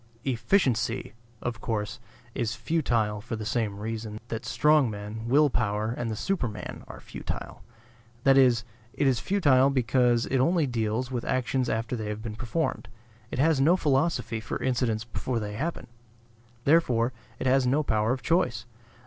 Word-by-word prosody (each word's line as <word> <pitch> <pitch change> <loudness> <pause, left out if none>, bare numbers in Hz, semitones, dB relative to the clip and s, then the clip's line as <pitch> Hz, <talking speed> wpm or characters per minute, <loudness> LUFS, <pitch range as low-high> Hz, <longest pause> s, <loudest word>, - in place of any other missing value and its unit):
"Efficiency," 125 - +1 0.3
of 120 -3 -3
course, 105 0 -3 0.3
is 115 -3 -1
futile 115 -7 0
for 115 +2 -5
the 110 -1 -5
same 110 -2 -1
reason 110 0 -5
that 115 - -4
strong 150 -4 +4
men, 105 +2 -6
will 145 +5 +5
power 110 -3 -1
and 120 -2 -3
the 110 - -2
superman 125 - -3
are - - -9
futile. - - -6 0.6
That 135 -1 +6
is, 125 -4 +5 0.3
it - - 0
is 130 -4 +3
futile 140 -9 +4
because 125 -2 +2
it 135 - 0
only 165 +4 +3
deals 120 0 -1
with 125 -2 -2
actions 130 0 0
after 115 +2 -1
they 110 -3 -4
have 105 +1 -4
been 110 -2 -5
performed. 125 +2 -2 0.4
It - - -5
has 150 +1 +3
no 170 +6 +5
philosophy 140 -6 +1
for 110 - -4
incidents 120 -4 0
before 120 +1 -3
they 105 -1 -4
happen; 155 +11 -3 0.8
therefore 130 -6 +3 0.2
it - - -5
has 130 0 +3
no 145 +5 +2
power 110 -3 +1
of 130 0 -2
choice. 165 -10 +1
120 Hz, 160 wpm, -27 LUFS, 110-135 Hz, 0.8 s, That